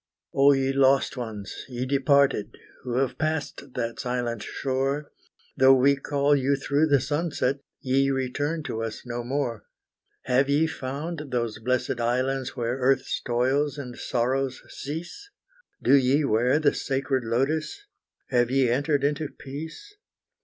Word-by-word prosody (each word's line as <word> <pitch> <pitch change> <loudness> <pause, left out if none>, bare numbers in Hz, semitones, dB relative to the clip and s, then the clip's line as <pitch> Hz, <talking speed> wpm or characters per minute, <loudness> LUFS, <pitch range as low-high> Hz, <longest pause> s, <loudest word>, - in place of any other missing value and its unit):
Oh 140 +1 +6
ye 135 0 +1
lost 135 0 +3
ones, 110 -5 -6
ye 125 0 -3
departed, 140 -3 +2 0.2
who 120 -1 -4
have 135 -1 0
passed 155 -4 -3
that 115 -2 -3
silent 120 -2 -2
shore, 135 +2 -2 0.4
Though 135 0 +7
we 135 +2 +4
call 140 +1 +1
you 140 0 +2
through 145 +3 +1
the 140 -2 +4
sunset, 145 -1 -1 0.2
ye 135 +1 +2
return 145 +4 -1
to 115 -7 -4
us 115 +1 -5
no 120 0 -4
more. 120 -4 -2 0.6
Have 135 +2 +2
ye 145 +3 +3
found 150 +2 -4
those 120 -3 -2
blessed 125 +1 -1
islands 130 +2 0
where 120 +1 -2
earth's 135 +1 +1
toils 130 +4 +1
and 125 -4 -6
sorrows 130 +2 -1
cease? 170 - -7 0.5
Do - - +4
ye 140 +2 +4
wear 125 +3 +3
the 155 -2 +3
sacred 135 -1 -1
lotus, 150 - -1 0.5
have 120 -2 +3
ye 130 -1 +3
entered 145 +2 +1
into 150 +1 0
peace? 160 - -9
135 Hz, 140 wpm, -26 LUFS, 125-145 Hz, 0.6 s, Though